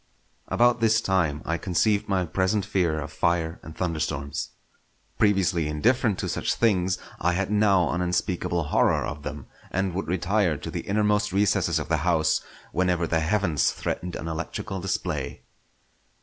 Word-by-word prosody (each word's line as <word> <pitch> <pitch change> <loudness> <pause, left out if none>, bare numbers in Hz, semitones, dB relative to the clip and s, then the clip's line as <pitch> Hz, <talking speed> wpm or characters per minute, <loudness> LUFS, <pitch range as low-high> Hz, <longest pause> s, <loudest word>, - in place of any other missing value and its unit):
About 120 0 +3
this 115 0 +4
time 85 -8 0
I 85 +1 -1
conceived 100 +3 +1
my 95 -2 +1
present 95 +4 0
fear 90 -6 0
of 70 - -6
fire 85 -1 0
and 80 - -11
thunderstorms. 75 -4 -2 0.7
Previously 95 -6 +2
indifferent 105 - +2
to - - -3
such - - -1
things, 95 -5 +2 0.2
I 90 +2 +1
had 100 +2 -1
now 100 -5 +4
an 90 - -1
unspeakable 90 -1 0
horror - - +3
of 75 - -5
them; 75 -2 -6 0.2
and 95 0 -1
would 95 0 -3
retire 90 -1 +1
to - - -7
the - - -5
innermost 105 0 +2
recesses 100 +1 +2
of - - -3
the 80 -1 +1
house 80 0 +2 0.3
whenever 90 -1 +1
the 80 0 +1
heavens 80 -5 +1
threatened 90 0 -4
an 80 - -5
electrical 85 +5 -4
display. 85 -6 -3
90 Hz, 155 wpm, -26 LUFS, 80-100 Hz, 0.7 s, this